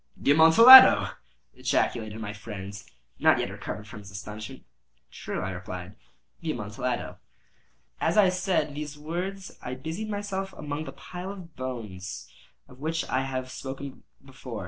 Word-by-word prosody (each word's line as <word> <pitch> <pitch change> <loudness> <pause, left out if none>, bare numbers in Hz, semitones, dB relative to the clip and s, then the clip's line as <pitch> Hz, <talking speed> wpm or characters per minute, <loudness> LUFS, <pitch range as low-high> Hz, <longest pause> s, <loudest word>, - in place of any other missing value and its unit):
"The - - +2
Amontillado!" 230 - +9 0.4
ejaculated 110 -1 -1
my 105 -2 -5
friend, 105 -2 -8 0.5
not - - +5
yet - - -2
recovered 105 - -7
from 105 - -10
his 100 -1 -12
astonishment. 105 +2 -8 0.5
"True," - - -5
I 95 +1 -3
replied; 90 +1 -7 0.4
"the 165 - -5
Amontillado." 120 +3 -4 0.8
As - - 0
I 200 -3 +6
said 180 -5 0
these 150 0 -6
words 180 +5 -5
I 125 - -5
busied 160 +11 -5
myself 195 -2 -4
among 150 +1 -5
the - - -7
pile 180 +2 -8
of 180 -5 -11
bones 105 -8 -7 0.4
of 125 - -17
which 160 +3 -2
I 130 - +1
have 130 -1 -3
before 135 +2 -7
spoken. - - -22
140 Hz, 145 wpm, -27 LUFS, 105-175 Hz, 0.8 s, Amontillado